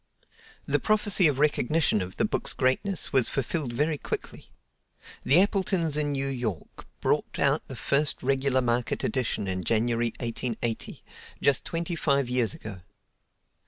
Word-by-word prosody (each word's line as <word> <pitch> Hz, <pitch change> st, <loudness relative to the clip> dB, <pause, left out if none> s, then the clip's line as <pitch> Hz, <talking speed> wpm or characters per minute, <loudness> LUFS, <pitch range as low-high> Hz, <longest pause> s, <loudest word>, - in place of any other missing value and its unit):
The -, -, +1 dB
prophecy 205 Hz, -4 st, +3 dB
of 145 Hz, -3 st, 0 dB
recognition 150 Hz, -4 st, +2 dB
of 90 Hz, 0 st, -6 dB
the -, -, +2 dB
book's -, -, -1 dB
greatness 150 Hz, +10 st, 0 dB
was 130 Hz, -3 st, +4 dB
fulfilled 135 Hz, 0 st, -2 dB
very 150 Hz, +5 st, 0 dB
quickly. -, -, -6 dB, 0.7 s
The 140 Hz, +7 st, +5 dB
Appletons 190 Hz, -5 st, +1 dB
in 150 Hz, -1 st, 0 dB
New 135 Hz, 0 st, -1 dB
York 120 Hz, -, -5 dB
brought -, -, 0 dB
out -, -, +1 dB
the -, -, -7 dB
first 145 Hz, 0 st, 0 dB
regular 135 Hz, 0 st, +2 dB
market 120 Hz, 0 st, -1 dB
edition 125 Hz, -6 st, -1 dB
in 95 Hz, -1 st, -2 dB
January, 115 Hz, +2 st, +1 dB
1880, 115 Hz, -1 st, -3 dB, 0.4 s
just 140 Hz, -3 st, +2 dB
twenty 170 Hz, +1 st, -3 dB
five 140 Hz, -5 st, +1 dB
years 120 Hz, -5 st, +1 dB
ago. 100 Hz, -4 st, -9 dB
135 Hz, 140 wpm, -27 LUFS, 120-150 Hz, 0.7 s, The